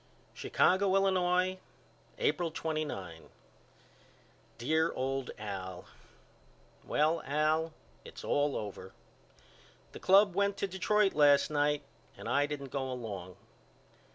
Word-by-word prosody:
Chicago, 190 +1 +2
Illinois, 185 -1 +2 0.6
April 170 +2 +1
29. 150 - -4 1.3
DEAR 160 +7 +1
OLD 135 0 -2
AL: 95 -4 -6 1.0
Well 155 +2 +1
Al 155 +3 +1 0.3
it's - - -11
all 145 0 +1
over. 95 -2 -7 1.0
The - - -10
club 195 0 +5
went 200 +1 +1
to - - -1
Detroit 195 +2 +1
last 145 0 +5
night 145 0 +1 0.3
and - - -8
I 145 +1 +2
didn't 140 -3 -6
go 135 -2 -2
along. 100 -7 -6
150 Hz, 100 wpm, -31 LUFS, 130-180 Hz, 1.3 s, club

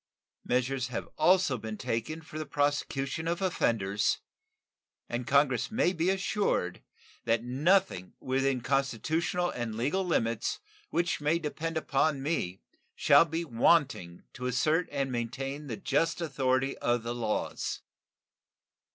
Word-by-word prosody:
Measures 125 0 0
have 125 -2 -4
also 180 -9 +3
been 110 0 -5
taken 115 +11 -3
for 155 0 -8
the 155 - -3
prosecution 145 0 -1
of 170 +1 0
offenders, 110 - +1 0.9
and 120 0 -4
Congress 135 -2 +3
may 220 -5 +2
be 170 +1 +1
assured 190 - 0 0.4
that 115 0 +2
nothing 135 - +1
within 135 0 0
constitutional 140 +7 0
and 120 -3 -4
legal 145 +12 0
limits 115 - 0 0.3
which 170 -2 0
may 150 +3 +2
depend 165 +1 -3
upon 140 -2 +1
me 115 - -2 0.3
shall - - +6
be 165 +1 -3
wanting 120 - +2
to 125 -1 -4
assert 155 +7 +1
and 140 -2 -1
maintain 135 +5 -4
the 115 -5 -4
just 165 +5 0
authority 135 -4 0
of 120 -1 +1
the 120 +1 -3
laws. 115 -3 -2
135 Hz, 125 wpm, -30 LUFS, 120-160 Hz, 0.9 s, shall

